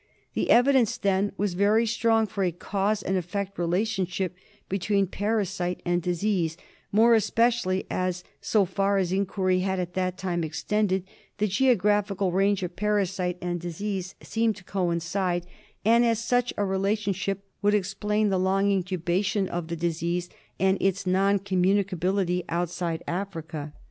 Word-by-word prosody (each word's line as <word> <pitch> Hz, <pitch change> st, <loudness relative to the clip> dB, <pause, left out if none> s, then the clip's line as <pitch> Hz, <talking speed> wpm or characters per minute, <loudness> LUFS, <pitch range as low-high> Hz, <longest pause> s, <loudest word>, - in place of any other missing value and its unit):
The -, -, -1 dB
evidence 250 Hz, -2 st, +4 dB
then 200 Hz, 0 st, +1 dB
was 200 Hz, -2 st, 0 dB
very 205 Hz, +5 st, +3 dB
strong 225 Hz, 0 st, +2 dB
for 200 Hz, -1 st, -3 dB
a 180 Hz, -, +1 dB
cause 200 Hz, +4 st, -1 dB
and 190 Hz, -, 0 dB
effect 195 Hz, +2 st, -4 dB
relationship 185 Hz, 0 st, -1 dB, 0.3 s
between 200 Hz, +1 st, +1 dB
parasite 195 Hz, -3 st, -1 dB
and 175 Hz, 0 st, +1 dB
disease, 175 Hz, -1 st, 0 dB, 0.3 s
more 225 Hz, +3 st, +5 dB
especially 225 Hz, -3 st, +2 dB
as, 185 Hz, -1 st, -2 dB, 0.2 s
so 210 Hz, -3 st, +2 dB
far 195 Hz, +2 st, +1 dB
as 185 Hz, -2 st, 0 dB
inquiry 190 Hz, -1 st, +1 dB
had 190 Hz, 0 st, -1 dB
at 180 Hz, 0 st, -3 dB
that 185 Hz, -1 st, -1 dB
time 180 Hz, -3 st, -2 dB
extended, 190 Hz, +4 st, 0 dB, 0.3 s
the 210 Hz, -, +1 dB
geographical 205 Hz, -4 st, +2 dB
range 195 Hz, +1 st, +2 dB
of 180 Hz, -, -4 dB
parasite 195 Hz, -3 st, 0 dB
and 175 Hz, -1 st, -2 dB
disease 185 Hz, +2 st, -4 dB
seemed 225 Hz, -1 st, 0 dB
to 190 Hz, -, -13 dB
coincide, 175 Hz, 0 st, -1 dB, 0.4 s
and 230 Hz, +2 st, +5 dB
as 230 Hz, -1 st, +2 dB
such 245 Hz, +2 st, +1 dB
a 205 Hz, -, +1 dB
relationship 195 Hz, 0 st, -1 dB, 0.2 s
would 205 Hz, 0 st, +3 dB
explain 210 Hz, +2 st, 0 dB
the 190 Hz, -1 st, +1 dB
long 195 Hz, +2 st, +2 dB
incubation 185 Hz, +2 st, 0 dB
of 175 Hz, -2 st, -4 dB
the 170 Hz, -, -3 dB
disease 170 Hz, +1 st, -2 dB, 0.3 s
and 190 Hz, +1 st, +2 dB
its 195 Hz, 0 st, +1 dB
non 195 Hz, +2 st, +3 dB
communicability 185 Hz, -1 st, +1 dB
outside 170 Hz, -1 st, -2 dB
Africa. 165 Hz, -5 st, -4 dB
195 Hz, 145 wpm, -26 LUFS, 180-205 Hz, 0.4 s, more